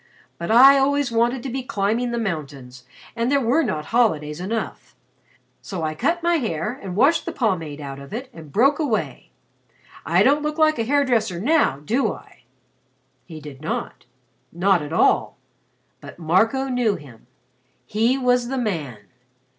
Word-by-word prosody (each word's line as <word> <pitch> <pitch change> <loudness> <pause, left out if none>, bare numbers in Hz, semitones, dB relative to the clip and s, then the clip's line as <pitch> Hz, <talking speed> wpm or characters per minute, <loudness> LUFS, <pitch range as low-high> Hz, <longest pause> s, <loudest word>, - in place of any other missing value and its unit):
But 170 - -5
I 270 +5 +8
always 285 -1 +1
wanted 235 +2 +1
to 270 - -4
be 265 +2 -3
climbing 235 -1 -1
the 235 - -3
mountains 140 - -5 0.3
and 235 +2 -1
there 280 - +3
were 260 +5 +2
not 155 - -2
holidays 155 -11 +1
enough. 220 +4 -5 0.7
So 185 -5 -6
I 155 0 -1
cut 335 - -1
my 345 0 +3
hair, 215 - -2
and 190 -3 -6
washed 275 - +3
the - - -1
pomade 165 - -2
out 140 -2 -7
of 140 - -12
it, 245 +5 -5
and 155 -3 -12
broke 275 - +3
away. 275 -9 -2 0.7
I - - +3
don't 290 +2 +3
look 300 +1 -3
like 310 -4 +3
a 225 - 0
hair 285 +3 +2
dresser 220 -8 0
now, 250 - +2
do 245 - +1
I?" - - -16 0.8
He 160 -3 -10
did 145 -2 -11
not. 155 - -5 0.5
Not 180 0 +2
at 150 +1 -7
all. 165 - +2 0.6
But - - -12
Marco 220 +11 +1
knew 245 -5 +1
him. 120 -6 -14 0.6
He 230 +5 +1
was 250 -2 +1
the 265 +2 -3
man. 160 - -3
225 Hz, 165 wpm, -22 LUFS, 160-265 Hz, 0.8 s, I